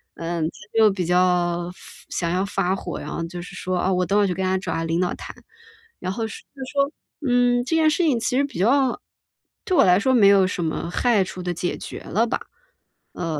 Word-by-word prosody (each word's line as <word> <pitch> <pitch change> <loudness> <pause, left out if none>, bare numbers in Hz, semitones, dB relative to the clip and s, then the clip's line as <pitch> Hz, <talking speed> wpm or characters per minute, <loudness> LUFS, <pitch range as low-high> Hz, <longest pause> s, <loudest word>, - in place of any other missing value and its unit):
嗯， 165 -1 -3
她 210 +7 -6
就 215 -1 +6
比 190 -2 -2
较 175 0 +2
发 - - -15
想 170 -2 -2
要 185 +2 +1
发 195 -2 0
火， 180 -2 -5
然 - - -7
后 165 - -3
就 175 +1 -7
是 175 - -10
说： 185 -1 -2
“哦， 190 - +2
我 180 0 +1
等 200 +3 +2
会 205 - +3
去 180 - -1
跟 190 - -2
他 185 - +1
找 - - -4
他 165 - -1
领 165 +1 0
导 180 -1 +1
谈。” - - -9 0.6
然 185 - -3
后 225 +2 -2
说 - - -9
就 270 - -11
说 280 0 +2 0.4
嗯， 245 0 +3
这 325 - 0
件 315 -1 +4
事 345 +3 +1
情 275 -7 +2
其 250 +3 0
实 280 - +3
比 280 - -5
较 255 +4 +3 0.7
对 370 - +1
我 - - +7
来 180 +1 +5
说 260 +4 +2
没 215 -6 +6
有 200 -1 +6
什 185 -1 -2
么 165 +1 -2
害 225 0 +2
处 185 0 -7
地 180 0 -2
解 175 +1 -3
决 - - -7
了 230 +4 0
吧。 - - -1 0.7
呃， 160 -3 -3
190 Hz, 255 characters per minute, -23 LUFS, 175-240 Hz, 0.7 s, 我